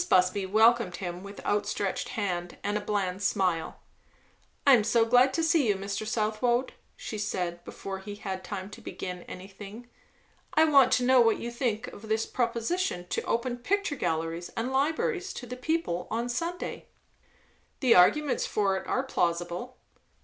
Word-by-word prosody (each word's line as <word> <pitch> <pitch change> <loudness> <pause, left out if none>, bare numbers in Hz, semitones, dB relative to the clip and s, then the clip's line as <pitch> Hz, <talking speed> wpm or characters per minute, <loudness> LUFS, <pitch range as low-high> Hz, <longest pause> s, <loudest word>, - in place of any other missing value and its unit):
Busby 185 +1 +3
welcomed 220 -1 +4
him 175 -1 -5
with 200 +1 -10
outstretched 205 -1 -1
hand 175 -4 -2
and 205 +1 -1
a 210 - 0
bland 200 -2 -1
smile. 185 -4 0 0.9
"I 280 - +8
am 230 -4 +6
so 225 +1 +3
glad 250 +3 +5
to 330 - +1
see 320 -5 +3
you, 205 - +3
Mr. 200 +2 -4
Southwode," 225 +3 0 0.2
she 215 - -6
said, 180 -4 -3
before 195 -1 -6
he 205 +1 -7
had 190 -2 -5
time 200 -1 -6
to - - -11
begin 180 -1 -6
anything. 200 +5 -10 0.7
"I 315 - +6
want 280 -4 +6
to 250 - +3
know 255 0 +6
what 225 -2 +4
you 235 - -5
think 235 -3 -1
of 215 +1 -11
this 220 0 +1
proposition 240 - -1
to - - -1
open 240 +1 -1
picture 385 +5 0
galleries 165 - -2
and 245 +3 -1
libraries 370 - 0
to 245 - -7
the 250 +1 -6
people 255 - -1
on 235 +2 -2
Sunday?" 335 +8 -4 0.9
"The 250 -4 +5
arguments 275 +11 +4
for 200 -2 +1
it - - -7
are 260 - 0
plausible." 175 +1 -2
215 Hz, 165 wpm, -28 LUFS, 190-250 Hz, 0.9 s, I